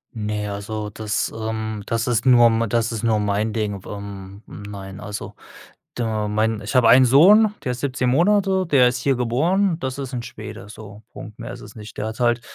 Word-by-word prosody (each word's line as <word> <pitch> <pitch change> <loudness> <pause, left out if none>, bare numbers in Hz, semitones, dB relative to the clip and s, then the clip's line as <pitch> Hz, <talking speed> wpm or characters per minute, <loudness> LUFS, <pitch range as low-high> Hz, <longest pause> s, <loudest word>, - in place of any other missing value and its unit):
Ne, 105 -1 -3
also 105 +1 -5
das, 105 0 -2
ähm, 110 -1 -4
das 115 0 -1
ist 115 -3 0
nur 120 -2 +7
m 115 -1 +2
das 115 +1 0
ist 110 -2 -4
nur 115 -2 +2
mein 105 +1 0
Ding. 105 -3 -3
Ähm, 100 0 -9
nein, 100 -1 -9
also 105 0 -7 0.6
du 120 - -2
mein 110 0 -1
ich 105 +5 -6
hab 125 - +5
einen 125 +3 +7
Sohn, 205 - +6
der 125 - -1
ist 125 - -5
17 130 -1 -1
Monate, 190 +4 +2
der 135 -6 +5
ist 125 0 -4
hier 135 +1 +1
geboren. 160 +10 +1
Das 130 -3 -4
ist 135 -2 -6
'n 125 - -3
Schwede 105 -3 -9
so, 105 -1 -11
Punkt. 105 - -11
Mehr - - -7
ist - - -10
es 105 - -12
nicht. 105 -2 -11
Der - - -3
hat's 110 +2 -7
halt 120 -1 +2
115 Hz, 205 wpm, -21 LUFS, 105-125 Hz, 0.6 s, nur